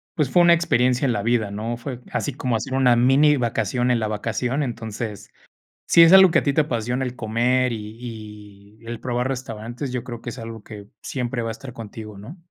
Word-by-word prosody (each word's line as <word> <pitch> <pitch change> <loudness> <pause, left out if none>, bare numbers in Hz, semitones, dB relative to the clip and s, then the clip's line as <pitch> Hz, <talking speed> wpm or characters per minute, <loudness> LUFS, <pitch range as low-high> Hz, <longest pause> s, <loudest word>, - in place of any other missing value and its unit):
pues, 150 -5 0
fue 175 - +5
una 170 0 +7
experiencia 125 -6 +2
en 125 - +2
la 105 - -1
vida, 110 -2 0
¿no? 110 +3 -4
Fue 120 +1 -6
así 145 - -2
como 125 -2 -1
hacer 115 +3 -3
una 130 -2 +4
minivacación 125 -2 +2
en 120 - +2
la 110 - -1
vacación. 115 +6 -2
Entonces, 110 -4 -5 0.6
si 170 - +6
es 165 0 +8
algo 190 -1 +8
que - - +4
a - - -6
ti 140 - +1
te 155 - +4
apasiona, 125 -2 -2
el 125 -1 -5
comer, 125 +2 +1
y 105 -2 -9 0.2
y - - -18
el 120 -1 -5
probar 125 0 -1
restaurantes, 125 0 -5
yo 125 -2 -3
creo 120 -2 -7
que - - -6
es - - -9
algo 115 -1 -8
que 105 -2 -10 0.2
siempre 125 -2 -3
va 115 - -3
a - - -2
estar 120 +3 -9
contigo, 110 -2 -9
¿no? 115 - -10
120 Hz, 215 wpm, -22 LUFS, 110-130 Hz, 0.6 s, es